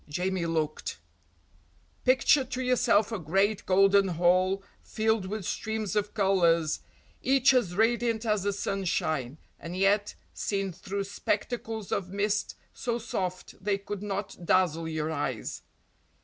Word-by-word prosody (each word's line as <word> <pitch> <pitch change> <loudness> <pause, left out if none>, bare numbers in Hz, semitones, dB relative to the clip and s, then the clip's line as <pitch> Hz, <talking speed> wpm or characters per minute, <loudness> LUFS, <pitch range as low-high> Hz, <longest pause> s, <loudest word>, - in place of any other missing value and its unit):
Jamie 180 +2 -1
looked 155 - -2 1.1
Picture 265 +2 +5
to 255 0 -4
yourself 235 -4 +3
a 220 - -2
great 195 +6 +1
golden 195 +1 +5
hall 185 +3 +2 0.2
filled 220 -3 0
with 210 -1 -4
streams 220 -2 -2
of 210 0 -1
colours, 170 -6 +3 0.4
each 270 0 +4
as 200 -9 +1
radiant 230 +1 +1
as 215 -2 +1
the 200 +2 0
sunshine, 165 -9 -1 0.2
and 175 +2 -6
yet, 200 +2 +2 0.2
seen 195 -2 -2
through 195 +3 -4
spectacles 220 +2 -3
of 185 -2 -1
mist, 205 +2 -1 0.2
so 235 -1 -2
soft 185 -4 -4
they 200 -1 +1
could 200 0 -6
not 200 -3 -4
dazzle 165 -2 +2
your 160 0 -2
eyes. 135 -7 -3
195 Hz, 130 wpm, -28 LUFS, 180-215 Hz, 1.1 s, Picture